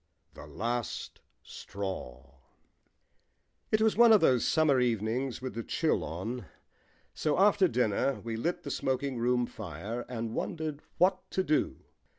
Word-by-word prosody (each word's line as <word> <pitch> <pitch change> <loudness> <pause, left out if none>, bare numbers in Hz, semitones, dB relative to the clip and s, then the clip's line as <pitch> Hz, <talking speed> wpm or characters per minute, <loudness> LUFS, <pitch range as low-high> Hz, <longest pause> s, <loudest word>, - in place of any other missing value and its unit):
THE 75 - -11
LAST 115 +10 -4 0.2
STRAW 70 -9 -7 1.4
It 215 - +3
was 220 - +3
one 235 0 +7
of 215 - +8
those 130 -8 +3
summer 155 -5 +3
evenings 120 +2 -1
with 130 - -4
the 115 - -3
chill - - 0
on, 95 +7 -5 0.7
so 150 -2 0
after 195 0 +5
dinner 125 - +1
we 115 0 -5
lit 165 +11 -2
the - - -5
smoking 130 -1 -1
room 125 +1 +2
fire 110 +2 -6
and 115 -2 -4
wondered 155 0 -3 0.2
what 185 +1 +2
to 190 - 0
do. 155 -3 0
125 Hz, 140 wpm, -30 LUFS, 110-155 Hz, 1.4 s, of